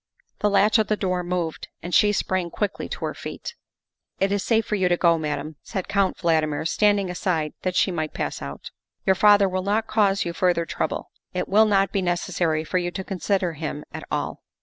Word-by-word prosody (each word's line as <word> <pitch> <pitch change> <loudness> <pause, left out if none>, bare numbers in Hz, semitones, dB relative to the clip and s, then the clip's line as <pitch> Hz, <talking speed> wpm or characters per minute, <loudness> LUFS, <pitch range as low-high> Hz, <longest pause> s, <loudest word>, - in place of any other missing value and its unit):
The 210 - +2
latch 205 +2 +4
of 215 - +2
the 215 - +1
door 185 -3 -1
moved 175 -2 -3 0.2
and 175 +1 -5
she 205 +5 +5
sprang 185 -3 -1
quickly 205 +3 -3
to - - -4
her - - -3
feet. - - -7 0.7
"It 195 +1 +2
is 200 -1 +1
safe 225 -2 +2
for 215 - -4
you 190 -3 +2
to 175 - +3
go, 170 -2 +3
Madame," 150 0 -4
said 190 -4 -5
Count 200 -2 +1
Valdmir, 160 -4 +1
standing 205 -1 +2
aside 165 -4 -1
that 185 -1 -2
she 190 - +3
might 155 -3 -2
pass - - -3
out. 70 0 -7
* - - -66
' - - -52
Your 190 - +5
father 205 +1 +5
will 185 0 -1
not 210 +3 0
cause 205 -3 +2
you 170 - -3
further 175 -1 +1
trouble; - - -3 0.2
it 180 - -1
will 215 +2 +5
not 195 -1 +3
be 200 - 0
necessary 175 -2 0
for 185 +3 0
you 175 0 -1
to 190 +2 -5
consider 190 -2 -1
him 150 -1 -5
at - - -6
all." - - -3
185 Hz, 215 wpm, -24 LUFS, 170-200 Hz, 0.7 s, she